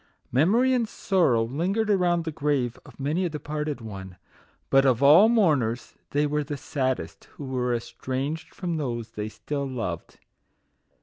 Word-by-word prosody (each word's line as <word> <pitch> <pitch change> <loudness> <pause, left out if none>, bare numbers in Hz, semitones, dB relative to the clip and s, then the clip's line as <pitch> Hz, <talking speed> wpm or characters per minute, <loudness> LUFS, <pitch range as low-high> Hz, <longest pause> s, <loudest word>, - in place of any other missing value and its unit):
Memory 215 - +3
and 235 -4 +1
Sor 185 -9 +2
row 115 -1 +3
lingered 185 - 0
around 175 -3 +2
the 160 - -2
grave 140 -5 -1
of - - -16
many 150 +7 0
a 180 - 0
de 150 -1 -5
parted 150 -2 -4
one; 95 -4 -8 0.5
but 135 0 +6
of 130 -1 +2
all 165 +10 +8
mourners 145 - +1 0.2
they 145 +1 +1
were 150 0 0
the 145 0 -5
saddest 130 -2 -3
who 145 - -8
were 125 -2 -1
estranged 135 +6 -4
from 175 -3 -3
those 120 -6 -3
they 105 0 -4
still 140 +4 -4
loved. 115 -10 -5
145 Hz, 165 wpm, -26 LUFS, 125-170 Hz, 0.5 s, all